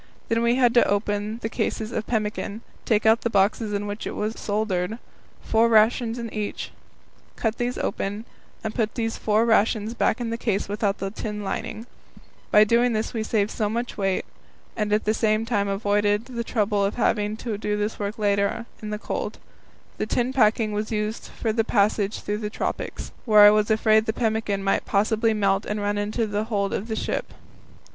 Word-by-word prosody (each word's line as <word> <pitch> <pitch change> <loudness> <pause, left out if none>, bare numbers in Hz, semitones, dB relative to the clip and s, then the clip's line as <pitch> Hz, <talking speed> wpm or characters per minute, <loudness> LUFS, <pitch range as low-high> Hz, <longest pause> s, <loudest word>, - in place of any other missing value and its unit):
Then 230 0 +2
we 235 +1 +3
had 245 -2 +4
to 240 - +5
open 205 +1 -1
the - - 0
cases 220 -1 -2
of 220 -2 -3
pemmican, 215 -1 -2 0.2
take 220 -2 +2
out 225 +1 +5
the 235 - 0
boxes 210 +1 +2
in 205 0 -2
which 205 +1 -5
it - - -5
was 215 +1 -2
soldered, 205 -1 -1 0.5
four 225 +1 +3
rations 225 +1 +3
in 230 -2 -5
each, 210 -1 -4 0.6
cut 225 -1 -2
these 245 +1 -1
open, 205 +3 -3 0.4
and 220 -1 -3
put 220 -3 -1
the 230 -2 0
four 220 0 +1
rations 220 -1 +2
back 235 0 +1
in 235 -2 -3
the 230 - -3
case 205 -4 0
without 205 0 -1
the 195 0 -4
tin 210 -1 -5
lining. 215 +3 -4 0.6
By 210 - +7
doing 235 +3 +3
this 215 0 -2
we 225 - -1
saved 215 -1 0
so 210 -2 -1
much 235 +3 -3
weight, 195 -2 0 0.5
and 210 -2 -1
at 210 +1 +2
the 215 - +2
same 220 0 +1
time 205 -4 0
avoided 205 +1 +1
the 240 -2 -4
trouble 210 -3 0
of 200 - 0
having 210 -3 +1
this 220 - -12 0.5
work 205 +1 -3
to - - -30
do - - -8
later 200 0 +3
on 230 - -6 0.2
in 215 - -5
the 210 - -2
cold. - - -4 0.6
The - - -1
tin 250 +1 0
packing 220 -3 +3
was 210 +1 -3
used 215 +1 -2
for 220 -2 -3
the 225 0 +2
passage 205 -1 +1
through 210 0 -2
the 210 -1 -3
tropics, - - -4
where 215 -3 +6
I 205 0 +10
was 210 0 +2
afraid 220 0 +3
the 220 - +1
pemmican 220 -4 -1
might 195 - +1
possibly 220 +2 +2
melt 195 -1 +2
and 210 0 -2
run 205 0 -1
into 210 +3 -1
the 210 0 -2
hold 200 -3 -1
of 210 - -3
the 220 - -2
ship. - - -3
215 Hz, 200 wpm, -24 LUFS, 205-225 Hz, 0.6 s, I